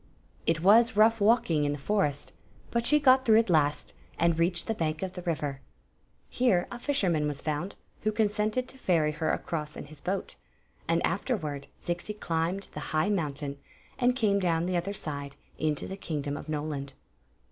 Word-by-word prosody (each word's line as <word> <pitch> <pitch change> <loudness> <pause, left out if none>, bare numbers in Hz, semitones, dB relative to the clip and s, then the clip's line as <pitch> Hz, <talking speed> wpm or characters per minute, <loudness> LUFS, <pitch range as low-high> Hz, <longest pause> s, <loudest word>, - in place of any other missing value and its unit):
It 165 -1 +2
was 225 +3 +6
rough 225 +1 +5
walking 200 -8 +3
in 145 0 +1
the - - -4
forest; 145 -3 -1 0.4
but 235 0 0
she 300 - +5
got 260 -2 +5
through 220 -4 +5
at 225 -4 +3
last, 150 -2 +1 0.2
and 165 0 +2
reached 170 0 +2
the 225 - -1
bank 160 -4 -2
of 185 -1 -3
the 180 - -6
river. 150 -5 -2 0.7
Here 220 -8 +2
a 240 - -6
fisherman 185 - +1
was 145 -1 -4
found, 155 +5 -2 0.3
who 215 - +1
consented 215 +3 0
to 265 - -13
ferry 165 -8 +2
her 160 +1 -2
across 150 -2 -3
in - - -7
his 145 0 -13
boat; 190 +1 -3 0.5
and - - +2
afterward 155 - -2
Zixi 175 +5 -4
climbed 170 +4 -1
the - - -6 0.2
high 155 +6 +2
mountain 145 -7 -2 0.4
and 250 0 +3
came 210 -6 +2
down 170 -3 +1
the 180 0 -1
other 180 +4 -1
mdc 140 -6 -6 0.3
into 155 -2 0
the 190 - -6
kingdom 145 -6 -3
of - - -8
Nokuid. 145 -3 -3
175 Hz, 180 wpm, -29 LUFS, 150-210 Hz, 0.7 s, was